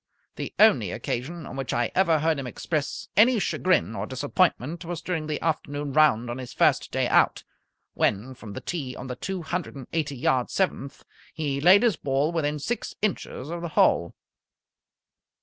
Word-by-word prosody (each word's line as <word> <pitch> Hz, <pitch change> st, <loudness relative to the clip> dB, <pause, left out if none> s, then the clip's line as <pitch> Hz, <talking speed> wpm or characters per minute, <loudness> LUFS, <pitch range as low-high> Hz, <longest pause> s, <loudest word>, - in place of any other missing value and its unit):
The -, -, -5 dB
only -, -, +5 dB
occasion 155 Hz, +7 st, -4 dB
on -, -, -8 dB
which 135 Hz, -1 st, -3 dB
I 120 Hz, -1 st, 0 dB
ever 170 Hz, -4 st, +3 dB
heard 155 Hz, -1 st, +1 dB
him 135 Hz, -, -5 dB
express 150 Hz, +3 st, -3 dB
any 230 Hz, +5 st, +6 dB
chagrin 185 Hz, -, +1 dB
or -, -, -3 dB
disappointment 145 Hz, +3 st, 0 dB
was 170 Hz, -1 st, -4 dB
during 165 Hz, -2 st, -3 dB
the 150 Hz, -1 st, -2 dB
afternoon 145 Hz, -3 st, -2 dB
round 140 Hz, -6 st, +4 dB
on 120 Hz, +2 st, -4 dB
his 125 Hz, -2 st, -8 dB
first -, -, +2 dB
day -, -, +1 dB
out, -, -, +3 dB, 0.5 s
when 110 Hz, +6 st, 0 dB
from 110 Hz, -5 st, -10 dB
the -, -, -6 dB
tee 140 Hz, -7 st, -4 dB
on 125 Hz, -, -8 dB
the 125 Hz, -1 st, -5 dB
two 185 Hz, +6 st, -4 dB
hundred 175 Hz, -1 st, -4 dB
and 135 Hz, -2 st, -8 dB
eighty 150 Hz, -4 st, -1 dB
yard 125 Hz, 0 st, +1 dB
seventh 160 Hz, -7 st, -2 dB, 0.3 s
he 145 Hz, -3 st, -2 dB
laid 185 Hz, +7 st, +7 dB
his 225 Hz, -9 st, +3 dB
ball 140 Hz, +3 st, 0 dB
within 150 Hz, -3 st, -1 dB
six 230 Hz, +12 st, -4 dB
inches 165 Hz, -7 st, -2 dB
of 170 Hz, 0 st, -4 dB
the 170 Hz, -, -4 dB
hole. 85 Hz, 0 st, +3 dB
150 Hz, 180 wpm, -26 LUFS, 130-170 Hz, 0.5 s, laid